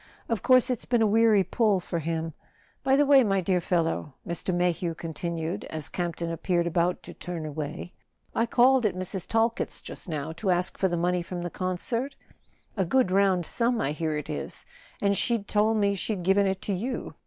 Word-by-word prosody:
Of 225 -5 -1
course 255 0 +4
it's 245 - -3
been 240 -2 +2
a - - +4
weary 215 -1 +4
pull 205 +1 +2
for 170 -1 -3
him. 160 0 -3 0.5
By 270 -1 +4
the 290 +1 +4
way, 275 -2 +7
my 195 -3 +2
dear 185 0 +1
fel¬ 175 -1 +1
low," 160 -3 -3
Mr. 170 +2 -2
Mayhew 175 -1 0
continued, 165 +1 -4
as 155 -2 -5
Campton 170 -1 -3
appeared 170 +1 0
about 170 +1 0
to - - -9
turn 175 -3 -6
away, 155 +3 -5 0.4
"I 230 - +1
called 255 +2 +4
at 190 - -4
Mrs. 185 0 -4
Talkett's 230 +1 0
just - - -7
now 155 -1 -3
to 165 +5 -3
ask 180 0 +1
for 190 - +1
the 175 -1 -1
money 180 +1 +1
from 175 0 -5
the 175 - -4
concert—a 205 +1 -4
good 250 +1 +2
round 190 -2 +3
sum, 235 +4 +1
I 145 - 0
hear 155 0 -2
it 150 - -5
is—and 200 - -4
she 235 +4 +2
told 215 +2 +2
me 200 -1 +2
she'd 195 0 -3
given 195 +2 +3
it 190 0 -2
to 205 - -1
you. 240 +8 -3
185 Hz, 195 wpm, -27 LUFS, 170-220 Hz, 0.5 s, way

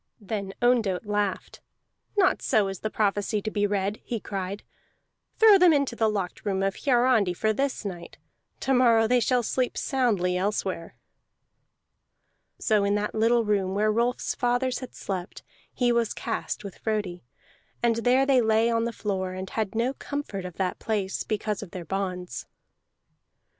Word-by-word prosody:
Then 200 -2 -5
Ondott 225 -6 +2
laughed. 205 -2 -2 0.6
"Not 385 -2 +3
so 210 -3 +2
is 195 - -6
the 215 - -3
prophecy 210 0 0
to 215 - -3
be 205 -1 +1
read!" 200 +1 -1
he 235 - -3
cried. 195 0 -5 0.7
"Throw 430 -3 +7
them 360 -1 +7
into 280 -4 +1
the 220 -1 +2
locked 195 -4 -3
room 195 -2 -1
of 195 0 +1
Hiarandi 240 -8 +3
for 220 +4 +1
this 270 -1 -2
night. 175 -3 -7 0.4
To 270 - +1
morrow 235 -3 +5
they 250 +2 +3
shall 245 +1 +2
sleep 250 +2 -1
soundly 215 -10 +1
elsewhere." 190 -2 -2 1.6
So 215 -3 +2
in 200 +1 +2
that 210 0 -1
little 230 +1 +3
room 195 -2 0
where 215 +1 +2
Rolf's 235 +3 0
fathers 245 +1 0
had 255 - -9
slept 185 -2 -5 0.3
he 245 -1 +1
was 235 -2 +1
cast - - -3
with 200 -2 -9
Frodi, 205 -5 -2 0.6
and 230 -1 +3
there 250 +3 +3
they 270 -2 +4
lay 225 +1 +3
on 230 0 +1
the 235 - -1
floor, 190 -4 -3
and 185 0 -6
had 215 -2 -2
no 240 +4 +1
comfort 275 -11 -5
of 180 -2 -7
that 185 -2 -2
place 205 -3 -2
because 215 -1 -2
of 205 - -8
their 175 -1 -7
bonds. 180 -6 -4
215 Hz, 165 wpm, -26 LUFS, 195-240 Hz, 1.6 s, Throw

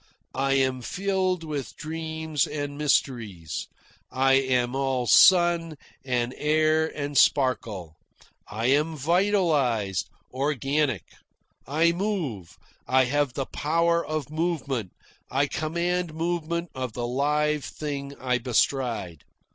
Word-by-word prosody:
I 135 +1 +1
am 130 -1 +1
filled 185 +3 -1
with 150 -4 -5
dreams 160 -2 -2
and 145 -1 -4
mysteries. 115 - -1 0.4
I 135 +1 +3
am 130 -2 +2
all 135 -2 0
sun 170 - +5 0.3
and 125 -1 -1
air 155 +1 +2
and 145 0 -4
sparkle. 110 - +2 0.5
I 110 +2 -4
am 150 +5 +2
vitalised, 150 - +1 0.2
organic. 135 - 0 0.6
I 160 +4 +3
move, 170 - -3 0.3
I 130 0 +4
have 145 0 0
the 135 - -2
power 170 +4 +1
of 155 -3 -4
movement, 150 - -2 0.4
I 140 +2 +2
command 170 +3 -2
movement 170 0 -2
of 130 -3 -4
the 120 +1 -3
live 150 +4 0
thing 140 -2 -5
I 125 -1 0
bestride. 120 - 0
145 Hz, 110 wpm, -26 LUFS, 130-160 Hz, 0.6 s, sun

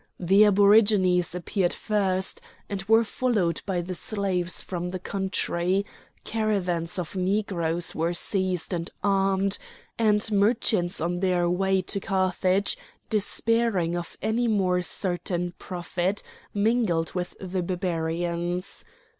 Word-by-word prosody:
The 195 +4 +5
aborigines 200 -3 +4
appeared 180 +1 -1
first, 190 -3 0 0.3
and 200 -2 -4
were 225 +2 +5
followed 220 -7 0
by 185 -3 0
the 180 +2 -5
slaves 185 -2 0
from 180 -1 -4
the 185 - -4
country; 190 0 -1 0.4
caravans 185 -7 -1
of 180 +1 -4
Negroes 180 -3 0
were 165 +2 -1
seized 185 -2 -1
and 170 -1 -2
armed, 195 0 +1 0.4
and 215 -1 +2
merchants 205 -3 +2
on 175 +2 -1
their 180 -2 +1
way 190 +1 +1
to 200 - -2
Carthage, 190 0 +1 0.3
despairing 215 -4 +1
of 175 -1 -6
any 225 +3 +1
more 185 -5 +2
certain 175 -1 -2
profit, 180 +2 -3 0.3
mingled 205 -6 +1
with 180 -1 -4
the 185 -1 -3
Barbarians. 175 0 -2
185 Hz, 115 wpm, -26 LUFS, 175-205 Hz, 0.4 s, The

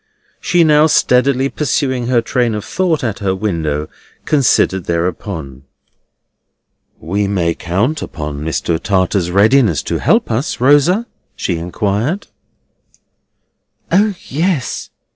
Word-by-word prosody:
She 175 -1 +2
now 155 0 +5
steadily 135 -2 +2
pursuing 135 -4 -1
her 120 -2 +2
train 120 -1 0
of 105 - -5
thought 175 -6 0
at 110 -5 -2
her 95 -2 -1
window, 80 -7 -2 0.4
considered 115 - +2
thereupon. 85 -5 -3 1.4
"We 100 +6 -1
may 90 -4 0
count 100 - -1
on 75 -2 -6
Mr. 80 +2 -1
Tartar's 95 -2 0
readiness 105 - +3
to - - -2
help - - +2
us, 125 +5 -2
Rosa?" 145 - +4 0.3
she 90 - -2
inquired. 105 - -2 1.7
O 205 +1 +3
yes! 155 -2 -2
110 Hz, 110 wpm, -16 LUFS, 90-140 Hz, 1.7 s, now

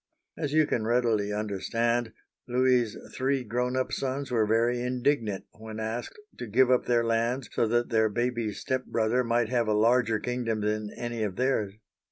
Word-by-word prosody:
As 150 -3 -3
you 155 0 +4
can 120 - -1
readily 115 -4 +1
understand, 115 +3 -1 0.4
Louis's 125 -2 +2 0.2
three 135 0 0
grown 125 +3 -1
up 130 - -1
sons 135 0 -3
were 110 -3 +2
very 120 +2 +2
indignant 125 -4 0
when 110 0 -9
asked 110 - -4 0.2
to 120 - -5
give 125 +4 +4
up 125 - +2
their 120 -1 +3
lands 115 +3 0
so 115 - +2
that 120 +2 +1
their 110 -1 +3
baby 120 0 -1
step 130 +4 -3
brother 115 +3 +1
might 115 -1 +1
have 120 -3 +1
a 110 - +2
larger 115 +1 +3
kingdom 115 -2 -2
than 105 0 -1
any 120 -1 -4
of 100 -4 -2
theirs. 110 -6 0
120 Hz, 175 wpm, -28 LUFS, 110-125 Hz, 0.4 s, you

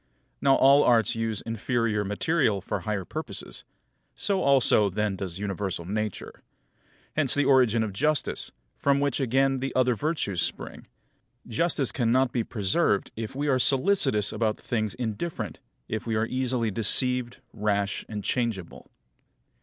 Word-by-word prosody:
Now 135 -1 +4
all 140 +2 +6
Arts 115 -4 +3
use 115 -2 -2
inferior 115 -1 -1
material 110 +2 0
for 100 +2 -4
higher 100 0 -3
purposes; - - -5 0.5
so 195 -2 0
also 130 -6 +4
then 105 +1 -1
does 95 -2 -5
universal 95 -3 -3
Nature. 105 +1 -4 0.7
Hence 145 -5 +3
the 145 - +2
origin 125 -4 +4
of 105 -3 -4
justice, 150 +7 -1 0.3
from 140 0 +2
which 140 -2 0
again 135 +1 +1
the 135 +1 -3
other 125 -1 +3
virtues 115 - -2
spring. - - -4 0.6
Justice 135 +2 0
cannot 125 +1 +1
be 120 - -1
preserved 105 - 0
if 110 +2 -6
we 145 +2 -2
are 130 -2 +2
solicitous 135 - +2
about 110 0 -1
things 110 -3 -2
indifferent, 125 +7 -4 0.3
if 110 +1 -4
we 115 - -1
are 110 +1 +1
easily 125 -2 -1
deceived, 125 +4 +3 0.2
rash, 100 -2 -1
and 105 -2 -5
changeable. 110 -5 -3
115 Hz, 140 wpm, -26 LUFS, 105-135 Hz, 0.7 s, all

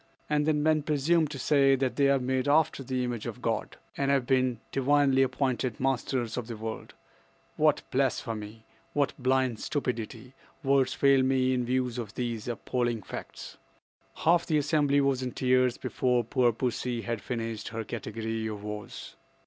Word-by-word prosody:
And 150 0 +1
then 150 -1 +2
men 155 0 +3
presume 155 +2 +2
to 145 - -7
say 135 0 +4
that 130 -1 -1
they 140 -1 +3
are 140 - +4
made 130 +1 -1
after 155 0 +3
the 130 -1 -2
image 120 -2 -3
of 120 +1 -6
God, 115 -3 -2 0.2
and 140 0 0
have 135 -3 +2
been 130 -3 +1
divinely 135 0 +3
appointed 130 -3 0
masters 130 -3 -1
of 120 -2 -3
the 115 -2 -6
world! 110 +1 -6 0.6
What - - +3
blasphemy! 110 0 -2 0.3
What 145 -1 +1
blind 130 -3 +1
stupidity! 125 -3 -4 0.3
Words 135 -1 +2
fail 140 -1 +4
me 130 0 +2
in 125 -1 0
view 130 +1 +1
of 120 -3 -6
these 120 -3 -3
appalling 120 -2 -2
facts." - - -8 0.6
Half 170 +1 +2
the 155 - +2
assembly 145 -1 +2
was 135 -2 +1
in 125 -1 -3
tears 130 -1 +2
before 125 -2 0
poor 120 +1 +2
pussy 120 0 -2
had 115 -3 -3
finished 115 -1 -4
her 115 0 -4
category 110 0 -4
of 105 -2 -6
woes. 105 -1 -7
130 Hz, 165 wpm, -28 LUFS, 115-140 Hz, 0.6 s, say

